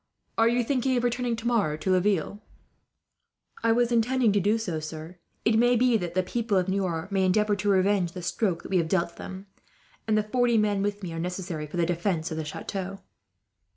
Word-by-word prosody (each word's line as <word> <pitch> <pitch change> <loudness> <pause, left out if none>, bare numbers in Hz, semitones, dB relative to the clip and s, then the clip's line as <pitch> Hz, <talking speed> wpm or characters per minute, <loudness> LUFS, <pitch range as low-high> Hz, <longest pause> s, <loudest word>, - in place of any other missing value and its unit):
"Are 225 - +4
you 240 +1 +2
thinking 260 +1 +1
of 240 - 0
returning 245 0 0
tomorrow 225 -9 0
to 190 +4 -1
Laville?" 190 +1 +1 1.2
"I 230 - +4
was 240 +1 +2
intending 240 0 +3
to 205 - +2
do 205 +4 +2
so, 180 -8 -3
sir. 160 +3 -8 0.3
It 225 0 +4
may 245 +1 +4
be 245 0 +3
that 175 -5 -2
the 185 - +2
people 220 +2 -1
of 180 0 +1
Niort 190 -2 -2
may 195 -1 +2
endeavour 210 +3 +2
to 205 +1 -1
revenge 190 -2 +2
the 180 - -7
stroke 175 -1 -1
that - - -9
we 190 - +3
have 165 -2 +1
dealt 170 -2 0
them, 190 +1 -8 0.6
and 215 -1 +2
the 215 - +2
forty 240 +1 +2
men 205 -2 +2
with 205 0 -2
me 170 -3 -5
are 165 - -4
necessary 175 -3 -4
for 150 - -7
the 170 - +2
defence 170 -1 -1
of 160 - -3
the 160 - -3
chateau." 195 +5 -5
195 Hz, 210 wpm, -27 LUFS, 175-225 Hz, 1.2 s, Are